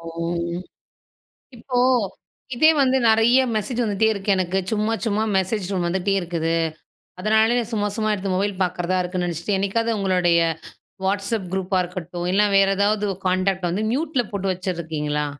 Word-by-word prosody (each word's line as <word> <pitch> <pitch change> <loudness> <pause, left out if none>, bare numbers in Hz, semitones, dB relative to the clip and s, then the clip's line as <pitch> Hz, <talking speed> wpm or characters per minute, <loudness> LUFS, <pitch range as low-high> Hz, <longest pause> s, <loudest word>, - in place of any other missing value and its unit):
ஓ! 165 - -14 1.5
இப்போ, 245 +2 -4 0.8
இதே 310 +6 +6
வந்து 265 0 +3
நெறைய 225 +3 +5 0.2
மெசேஜ் 230 +4 -1
வந்துட்டே 215 0 +1
இருக்கு 200 0 -5
எனக்கு. 185 +1 -1
சும்மா, 215 +1 0
சும்மா 215 0 +1
மெசேஜ் 190 0 -1
டோன் 180 -3 0
வந்துட்டே 190 +3 0
இருக்குது. 165 -1 -2 0.7
அதனாலயே 220 +3 +3
நான் 235 0 -4
சும்மா, 205 -1 0
சும்மா 215 0 0
எடுத்து 195 -2 -2
மொபைல் 200 +1 0
பாக்கறதா 180 0 -1
இருக்குன்னு 180 0 -2
நெனைச்சிட்டு, 170 +4 -2
என்னைக்காவது 225 +3 0
உங்களுடைய 180 -3 +2 0.7
வாட்ஸ்அப் 200 -1 -1
குரூப்பா 190 0 0
இருக்கட்டும், 175 -1 -5
இல்லன்னா 205 +1 +3
வேறு 195 0 +4
ஏதாவது 205 +1 +1 0.2
கான்டாக்ட் 185 0 0
வந்து 200 +5 -1
மியூட்ல 280 -2 0
போட்டு 195 -1 -1
வச்சுருக்கீங்களா? 160 -5 -3
195 Hz, 145 wpm, -22 LUFS, 180-215 Hz, 1.5 s, இதே